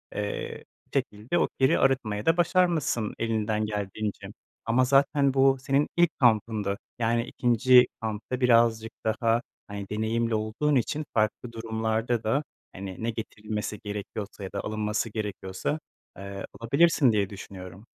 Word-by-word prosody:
eee, 105 -1 -4 0.3
şekilde 105 +11 -1
o - - +3
kiri 130 0 +4
arıtmayı 110 -6 +1
da 165 +1 +4
başarmışsın 170 - +1
elinden 110 -1 0
geldiğince. 105 0 -4 0.4
Ama 120 +3 +3
zaten 140 +1 +3
bu 135 0 +4
senin 135 +2 +1
ilk 175 -2 +3
kampındı. 110 -5 +2 0.2
Yani 115 0 +2
ikinci 125 +1 +5
kampta 110 +3 -4
birazcık 115 -2 +4
daha 115 +1 +1 0.3
hani 100 -1 -7
deneyimli 110 +2 0
olduğun 110 +8 0
için 145 +5 0
farklı 110 +2 0
durumlarda 115 +1 -1
da 135 +7 +1 0.3
hani 95 +1 -7
ne 115 - 0
getirilmesi 105 -2 -4
gerekiyorsa 105 0 -6
ya 95 - -6
da 100 - -3
alınması 105 +1 -2
gerekiyorsa, 105 +5 -3 0.4
eee, 100 0 -6 0.2
alabilirsin 140 +2 +4
diye 100 -3 +1
düşünüyorum. 95 0 -10
110 Hz, 130 wpm, -27 LUFS, 105-130 Hz, 0.4 s, ikinci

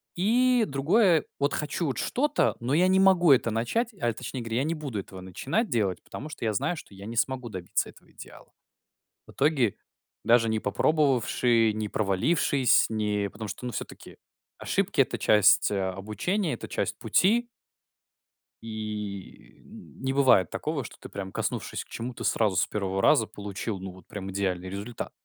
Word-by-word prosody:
И 240 +5 +3
другое 165 +5 +3
вот 140 0 +1
хочу 150 +3 -2
вот 135 -6 -2
что-то, 295 +4 +1
но 120 +4 -2
я 175 +4 +4
не 190 +1 +4
могу 185 -4 +5
это 120 -3 +4
начать. 170 - -1
А 120 - +2
точнее 125 +2 -6
говоря, 115 0 -3
я 130 - +2
не 160 +3 -1
буду 140 -9 -4
этого 95 -1 -9
начинать 135 - -2
делать, 100 -6 0
потому 150 - -8
что 150 - -8
я 110 - +1
знаю, 140 - 0
что 130 -10 -11
я 100 +1 -10
не 115 +2 -6
смогу 125 0 -1
добиться 95 -4 -2
этого - - -19
идеала. - - -13 0.8
В - - -14
итоге, 135 -7 +1 0.5
даже 115 -1 +4
не 110 0 0
попробовавши, 120 -3 +2
не 110 -1 -3
провалившись, 120 - +2
не 105 -2 -1
потому 110 +1 -7
что- 125 - -7
ну 125 - -4
все-таки - - -8 0.4
ошибки - - 0
это - - +2
часть, 105 -1 +5
а, 95 -2 -1
обучения, 145 - -2
это 120 - -6
часть - - -2
пути 235 +5 +2 1.2
и 105 -3 -7
не 130 0 -7
бывает 130 - +4
такого, - - -3
что - - -11
ты - - -10
прям 95 -1 -6
коснувшись - - -3
к - - -32
чему-то 120 +1 -6
сразу, 105 -5 +1
с - - +2
первого 95 -2 -2
раза 130 -2 +5
получил 100 0 -5
ну 95 0 -7
вот 95 0 -16
прям 95 -1 -6
идеальный 95 -2 -2
результат. 100 +5 -6
115 Hz, 170 wpm, -27 LUFS, 100-150 Hz, 1.2 s, могу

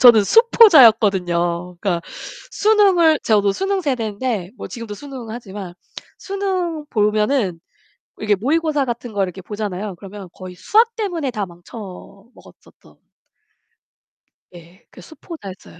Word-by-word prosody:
저는 235 -5 +8
수포자였거든요. 200 - +4
그러니까 175 -4 -1 0.5
수능을 390 -9 +4
저도 205 -2 +2
수능 390 - -1
세대인데 230 - -2
뭐 - - -8
지금도 230 -3 -7
수능 260 -1 -9
하지만. 200 -6 -8 0.5
수능 370 -5 -3
보면은 210 -3 +1 0.6
이렇게 210 -1 +1
모의고사 295 - 0
같은 240 -1 -5
걸 200 -1 0
이렇게 185 0 -7
보잖아요. 205 -1 -5
그러면 195 +1 -10
거의 185 -1 -10
수학 455 - +2
때문에 350 - -2
다 210 -5 -3
망쳐 175 +6 -13 0.6
먹었었던. - - -20 1.6
네. 175 +3 -16
그 - - -14
수포자였어요. 255 - -11
220 Hz, 305 characters per minute, -20 LUFS, 195-315 Hz, 1.6 s, 저는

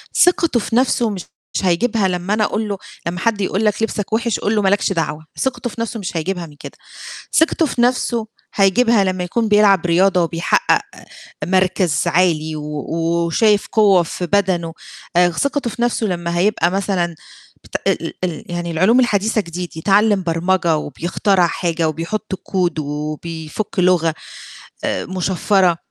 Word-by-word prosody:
ثقته 335 -7 +3
في 225 - -3
نَفسه 245 -2 +2
مش 195 -4 -5 0.4
هيجيبها 195 +3 +1
لمّا 180 +2 -2
أنا 215 0 +2
أقول 215 0 -1
له، 200 - -2 0.3
لمّا 175 +2 -3
حد 215 0 0
يقول 195 +2 0
لك 210 +1 +1
لِبسك 215 -1 -3
وِحش 230 -1 0
قل 210 - 0
له 210 - +2
ما 195 - +3
لكش 200 0 +1
دعوة، 155 -2 -3
ثقته 260 -2 -2
في 230 - -7
نَفسه 230 0 -3
مش 180 -3 -4
هيجيبها 175 +1 -2
من 150 - -14
كده. - - -10 0.6
ثقته 320 +1 +3
في 250 - -3
نَفسه 240 -2 +1 0.3
هيجيبها 210 +2 +3
لمّا 185 -1 -1
يكون 225 +5 -1
بيلعب 205 -3 +4
رياضة 180 +1 +3
وبيحقق 165 +1 +1 0.6
مركز 185 -4 +1
عالي 160 -3 +1
و 150 -1 -5
وشايف 170 +6 +1
قوة 200 -5 +4
في 180 +2 -4
بدنه. 175 -4 0 0.4
آآ 175 0 +5
خ - - -11
ثقته 280 -3 0
في 235 - -7
نَفسه 240 -2 +1
لمّا 175 -2 -2
هيبقى 180 -2 +2
مثلًا 185 -3 -1 0.5
بت - - -16
ال - - +1
ال - - -7
ال 170 -4 -3
يعني 175 0 -3
العلوم 190 +10 +3
الحديثة 220 -2 +2
جديد، 175 -2 -7
يتعلّم 200 +3 +3
برمجة 170 0 +1
وبيخترع 175 +5 0
حاجة 165 -1 -1
وبيحُط 170 +7 -4 0.2
code 175 -4 0
وبيفُك 155 +6 -4
لُغة 175 -3 +3 0.7
آآ - - -1
مُشفرة، 185 -1 +1
185 Hz, 160 wpm, -19 LUFS, 170-215 Hz, 0.7 s, آآ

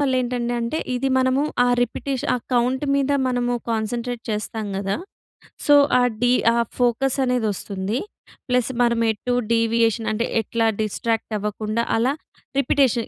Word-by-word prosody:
వల్ల 275 -2 +1
ఏంటండి 245 -1 -2
అంటే, 235 +7 -2 0.2
ఇది 260 +2 0
మనము 260 +2 +2 0.2
ఆ - - +3
రిపిటీష 260 +2 -3
ఆ - - +1 0.2
కౌంట్ 250 +3 +1
మీద 280 0 +1 0.2
మనము 245 -1 0 0.2
కాన్సంట్రేట్ 235 +2 -2
చేస్తాం 215 +1 -3
గదా! 195 0 -1 0.7
సో, 290 - +6 0.2
ఆ - - +4 0.2
డీ 245 0 +4 0.2
ఆ - - +1 0.2
ఫోకస్సనేదొస్తుంది. 240 -4 0 0.5
ప్లస్ 250 -1 +2
మనమెటూ 235 0 +1 0.2
డీవియేషన్ 230 0 +2
అంటే, 225 +2 0 0.2
ఎట్లా 225 +1 -1 0.2
డిస్ట్రాక్టవ్వకుండా 215 0 -2
అలా 240 +4 +2 0.5
రిపిటేషన్. 255 -3 +2
235 Hz, 125 wpm, -22 LUFS, 225-250 Hz, 0.7 s, సో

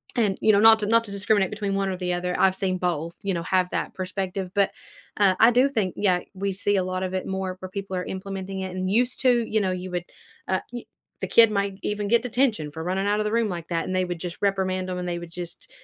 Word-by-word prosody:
and, 210 -6 +1
you 215 - +5
know, 200 - +4
not 225 0 +8
to 210 - -2
not 230 +1 +4
to 205 - -8
discriminate 200 -1 +1
between 205 -2 -2
one 195 0 0
or 185 - -3
the 180 -1 -1
other, 180 0 -2
I've 190 0 +4
seen 185 -1 -1
both, 170 -2 -1
you 195 -3 -1
know, 165 - -3
have 185 0 +1
that - - -2
perspective, 185 0 -4
but, 200 -1 +3 0.5
uh, 195 -3 +4
I 225 +2 +7
do 255 +3 +4
think, 210 -9 -1
yeah, 185 -3 +2
we 195 +1 -2
see 200 +1 0
a 185 - +2
lot 185 0 -3
of 185 0 -3
it 185 - -2
more 190 -1 -3
where 185 - -7
people 195 -1 -5
are 180 - -2
implementing 190 0 -5
it 185 -1 -5
and 185 0 -2
used 245 +5 +1
to. 245 -3 +3
You 215 -1 +1
know, 190 -1 0
you 185 0 -5
would, 175 -1 -2 0.4
uh, 190 - 0
you 240 -1 -7 0.4
the - - -1
kid 230 -2 +6
might 200 -1 -1
even 210 0 -2
get 235 +2 +4
detention 235 - 0
for 160 +1 -6
running 190 +3 -1
out 205 +1 +1
of - - +1
the 210 - -1
room 230 -2 +1
like 170 -2 -5
that, 165 -1 -1
and 185 - -3
they 185 - +2
would 175 -2 -5
just 175 -1 -5
reprimand 190 -2 0
them, 180 - -3
and 180 0 -4
they 175 0 -2
would 170 - -9
just, 180 - -7
190 Hz, 275 wpm, -25 LUFS, 185-210 Hz, 0.5 s, not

